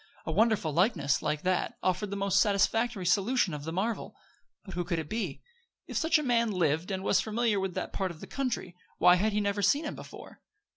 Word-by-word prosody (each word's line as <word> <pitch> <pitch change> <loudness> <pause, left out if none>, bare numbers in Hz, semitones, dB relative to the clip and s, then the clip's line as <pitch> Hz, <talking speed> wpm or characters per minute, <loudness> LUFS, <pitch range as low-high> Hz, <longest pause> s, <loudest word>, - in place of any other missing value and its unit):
A - - -2
wonderful 210 -4 +2
likeness, 175 - +2
like 150 0 -2
that, 185 -1 0
offered 185 +3 0
the 200 - -4
most 200 -1 +2
satisfactory 205 0 +1
solution 200 0 +2
of 145 -1 -6
the 160 - -3
marvel. 205 +7 -2 0.5
But 190 - -9
who 175 - -1
could 175 -1 -2
it 160 -2 -4
be? 205 -9 -4 0.4
If - - -9
such 320 0 +3
a 305 - -2
man 235 -3 +2
lived, 170 -3 0
and 190 -1 -3
was 195 - +3
familiar 220 -1 0
with 190 -2 -3
that - - -4
part 190 -1 -1
of 170 -3 -10
the - - -8
country, 250 -9 -3 0.2
why 180 +1 +6
had 215 +4 +1
he 210 - 0
never 200 0 -1
seen 280 - +2
him 290 - -3
before? - - -11
195 Hz, 215 wpm, -29 LUFS, 175-225 Hz, 0.5 s, why